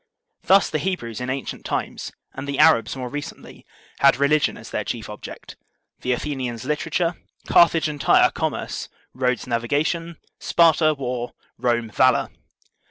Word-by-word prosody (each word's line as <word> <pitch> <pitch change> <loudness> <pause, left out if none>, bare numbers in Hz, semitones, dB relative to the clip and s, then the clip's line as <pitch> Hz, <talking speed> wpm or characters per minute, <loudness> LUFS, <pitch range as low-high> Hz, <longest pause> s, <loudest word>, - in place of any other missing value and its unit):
Thus 195 +1 +5
the 155 - 0
Hebrews 130 - -3
in 125 - -3
ancient 135 -1 -4
times, - - -4 0.2
and 135 +1 -7
the 140 -1 -3
Arabs 115 +2 +4
more 130 -1 -5
recently, 145 +3 -8 0.3
had 140 -1 +5
religion 145 +2 +2
as - - -11
their - - -2
chief - - -5
object, - - -10 0.4
the 125 - -2
Athenians 125 -2 -3
literature, 165 +4 -1 0.3
Carthage 165 -2 +5
and 150 -2 -5
Tyre - - +5
commerce, - - -3 0.2
Rhodes 125 -3 -1
navigation, 145 +8 -1 0.2
Sparta 160 -2 +4
war, 125 -3 -4 0.3
Rome 120 -2 0
valor. 130 +2 +3
135 Hz, 140 wpm, -23 LUFS, 125-155 Hz, 0.4 s, Thus